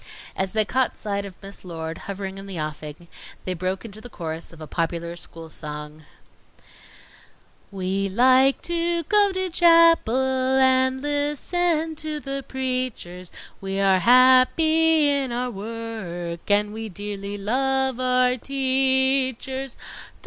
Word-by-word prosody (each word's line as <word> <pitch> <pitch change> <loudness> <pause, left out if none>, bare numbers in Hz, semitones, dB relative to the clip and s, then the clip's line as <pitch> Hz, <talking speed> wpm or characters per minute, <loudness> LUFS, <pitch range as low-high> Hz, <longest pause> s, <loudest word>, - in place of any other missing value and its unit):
As 190 0 -2
they 215 -1 +3
caught 260 +3 0
sight 200 -1 -3
of 195 -2 -10
Miss 195 0 -10
Lord 165 -2 -6
hovering 195 0 -5
in 195 - -10
the 185 -4 -6
offing, 155 +2 -6 0.4
they 185 - -2
broke 185 +3 -3
into 215 -1 -10
the 245 - -10
chorus 165 -5 -6
of 165 - -15
a 155 - -7
popular 170 +2 -3
school 165 -1 -9
song: 150 0 -8 1.6
"We 195 0 -2
like 260 +6 +4
to 340 0 0
go 410 +3 +3
to 375 0 -1
chapel 335 -7 +5 0.4
And 260 0 +3
listen 310 +3 0
to 310 -1 -4
the 275 -1 -5
preachers, 255 -9 -4 0.3
We 195 0 -3
are 195 -1 +4
happy 295 - +5
in 280 -3 +1
our 245 +1 -2
work, 200 -6 -6
And 205 +1 +2
we 220 0 -6
dearly 205 +1 -6
love 265 +4 0
our 255 0 +2
teachers. 265 0 0
235 Hz, 130 wpm, -23 LUFS, 190-270 Hz, 1.6 s, chapel